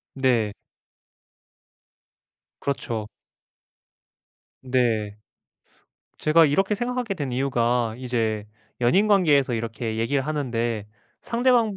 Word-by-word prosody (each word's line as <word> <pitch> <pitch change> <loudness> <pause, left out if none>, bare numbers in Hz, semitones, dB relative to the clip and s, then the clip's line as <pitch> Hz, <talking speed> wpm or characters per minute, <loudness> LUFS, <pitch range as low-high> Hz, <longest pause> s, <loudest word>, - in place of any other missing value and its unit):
네. 120 -6 +2 2.1
그렇죠. 115 -6 -3 1.5
네. 115 -5 0 1.0
제가 160 +1 +5
이렇게 195 +8 +2
생각하게 245 -1 -2
된 145 -7 -4
이유가 120 -3 +1
이제 115 -4 -2 0.3
연인 185 - +4
관계에서 150 - +4
이렇게 115 0 -3
얘기하는데 120 -4 -1 0.3
상대방 235 -4 +2
130 Hz, 190 characters per minute, -24 LUFS, 115-165 Hz, 2.1 s, 제가